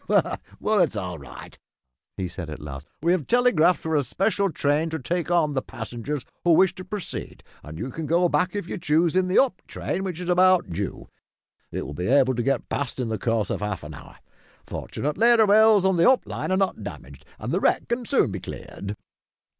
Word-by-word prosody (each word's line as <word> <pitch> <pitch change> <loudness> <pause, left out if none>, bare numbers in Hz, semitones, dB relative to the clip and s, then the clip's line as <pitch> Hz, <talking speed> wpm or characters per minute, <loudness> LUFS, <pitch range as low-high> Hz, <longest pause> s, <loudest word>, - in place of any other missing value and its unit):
"Well, 215 -1 0
it's 170 -10 +2
all 90 -5 -4
right," 70 -3 -11 0.6
he 95 - -2
said 85 -2 -7
at 75 - -7
last, 75 0 -8 0.2
"we 170 - +3
have 180 -6 0
telegraphed 200 -9 +4
for 160 -1 -2
a 145 - +4
special 195 - 0
train 150 +2 +1
to 160 - -3
take 170 +4 -2
on 165 -4 +2
the 130 - 0
passengers 120 +5 -6 0.2
who 175 - +5
wish 190 +3 +5
to 185 - -9
proceed, 190 +1 -6 0.2
and 75 +1 -9
you 130 - -4
can 160 +3 -5
go 175 +2 +3
back, 175 +5 0
if 200 -4 -3
you 190 - -5
choose, 160 +2 +2
in 185 0 +3
the 185 - +1
up 250 -9 +3
train, 190 - -3
which 180 -3 -4
is 180 - -5
about 185 - +4
due. 95 +3 -4 0.6
It - - -4
will - - -7
be 90 +4 -3
able 130 0 +4
to 120 - -1
get 135 0 0
past 140 -2 -3
in 120 -3 -1
the 110 -2 -2
course 115 -3 0
of - - -2
half 105 -5 -3
an 75 +1 -8
hour. - - -12 0.5
Fortunately 225 - +1
the 220 - +6
rails 210 -1 +5
of 190 -2 +3
the 170 - +6
up 260 - +3
line - - -4
are 185 - +3
not 195 -1 0
damaged - - -9
and - - -4
the - - +2
wreck - - +1
can 240 +1 -1
soon 275 - +2
be - - -4
cleared." - - -7
160 Hz, 215 wpm, -24 LUFS, 120-185 Hz, 0.6 s, the